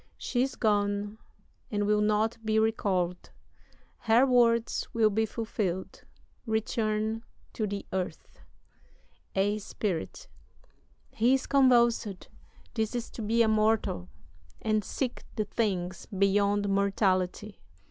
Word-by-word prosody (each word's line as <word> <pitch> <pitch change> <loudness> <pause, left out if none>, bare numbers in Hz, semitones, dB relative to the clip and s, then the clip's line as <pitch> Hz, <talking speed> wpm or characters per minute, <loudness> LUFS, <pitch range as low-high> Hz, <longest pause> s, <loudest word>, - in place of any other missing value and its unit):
She's 260 +1 -1
gone, 205 0 0 0.5
and 205 -1 -1
will 210 0 +2
not 215 +2 +1
be 220 0 +1
recall'd; 190 -5 0 0.7
Her 230 +4 +4
words 235 -3 +2
will 220 -2 +3
be 220 +2 +1
fulfill'd. 200 -5 -3 0.4
Return 220 0 -1 0.3
to 215 - -2
the 200 0 -5
earth. 185 -1 -4 1.0
"A 205 +2 +1
SPIRIT. 200 -4 -4 0.8
He 240 +4 +3
is 265 - -2
convulsed. 240 -7 +3 0.4
This 220 0 -1
is 240 -1 -4
to - - -7
be 225 +2 +3
a - - +2
mortal, 215 - +1 0.5
And 215 -1 +1
seek 250 +5 -3
the 215 -2 -1
things 185 -5 -2
beyond 200 +1 +2
mortality." 195 0 0
215 Hz, 110 wpm, -29 LUFS, 200-225 Hz, 1.0 s, Her